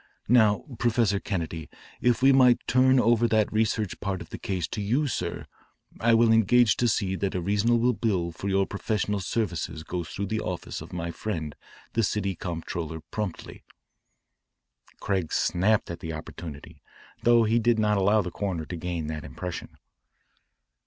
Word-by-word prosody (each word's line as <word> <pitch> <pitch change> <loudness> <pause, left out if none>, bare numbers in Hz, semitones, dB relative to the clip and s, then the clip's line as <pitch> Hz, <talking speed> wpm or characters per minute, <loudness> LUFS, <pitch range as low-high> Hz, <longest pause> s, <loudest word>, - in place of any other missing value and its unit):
Now, 110 -3 +4
Professor 115 -4 +2
Kennedy, 85 -5 -4 0.3
if 125 +1 +2
we 135 - +7
might 125 -2 +5
turn 130 +1 +4
over 120 0 +3
that 110 -2 +1
research 110 -2 0
part 100 -2 -2
of - - -11
the - - -6
case 90 -4 -2
to 105 - -4
you, 125 +9 +1
sir, 90 -10 -3 0.5
I 115 +1 +4
will 115 0 +5
engage 115 +1 +5
to 120 - +2
see 100 -4 0
that 100 -1 -2
a - - 0
reasonable 115 +6 +2
bill 95 -7 -1
for 95 +4 -5
your 95 0 +2
professional 105 0 -2
services 90 -5 -2
goes 85 0 -4
through 100 - -3
the 110 +2 -2
office - - -5
of - - -10
my 85 -1 -4
friend 80 -6 -4 0.4
the 115 - +2
city 100 -2 0
comptroller 80 -2 -5
promptly." 105 -5 -5 1.4
Craig 95 -5 -1
snapped 100 +2 +1
at 85 - -6
the 80 -1 -5
opportunity, 75 -1 -9 0.4
though 120 -1 +5
he 115 +2 +2
did 120 0 +2
not 105 -1 +2
allow 100 +2 +3
the 90 - -5
coroner 95 -6 -3
to 90 - -6
gain 85 -1 -3
that 75 0 -5
impression. 90 -2 -7
100 Hz, 165 wpm, -26 LUFS, 85-115 Hz, 1.4 s, we